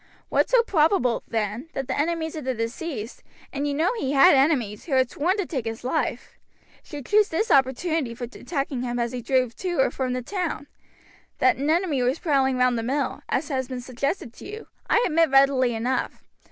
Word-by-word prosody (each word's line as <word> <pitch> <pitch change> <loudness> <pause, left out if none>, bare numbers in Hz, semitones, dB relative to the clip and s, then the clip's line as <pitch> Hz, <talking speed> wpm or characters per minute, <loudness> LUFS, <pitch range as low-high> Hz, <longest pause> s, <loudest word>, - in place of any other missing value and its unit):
"What - - +2
so - - +5
probable, 310 - +2
then, 225 +6 -3
that 270 -1 -4
the 260 - -2
enemies 320 +1 -1
of 310 - -5
the 260 0 -2
deceased 230 +1 -5 0.3
and 280 +1 -2
you 285 - -1
know 315 +3 +1
that - - -5
he 270 +1 -1
had 275 -1 +7
enemies, 265 -7 +1
who 305 - -4
had 260 -2 +3
sworn 360 +7 0
to 400 - -1
take 260 -9 -4
his 225 +1 -5
life 255 - -3 0.4
should 290 -4 -9
choose 420 0 +3
this 380 +8 -1
opportunity 270 0 +1
for 245 - -8
attacking 275 +1 -4
him 245 -1 -3
as 235 -1 -1
he 250 -1 -5
drove 255 -1 0
to 355 -4 -3
or 265 - +3
from 255 -2 -2
the 250 0 -3
town. 355 - -3 0.7
That 380 - +3
an 285 +3 -1
enemy 320 -5 +1
was 250 +4 +1
prowling 270 -6 +1
round 250 -1 +2
the - - -1
mill, 265 +4 -2
as 285 +4 -1
has 260 -3 -2
been 255 -1 -5
suggested 255 +1 -3
to - - -12
you, 430 +2 -8 0.2
I 470 - +4
admit 330 -1 +3
readily 270 -3 +4
enough. 245 +4 -2
270 Hz, 205 wpm, -24 LUFS, 250-320 Hz, 0.7 s, had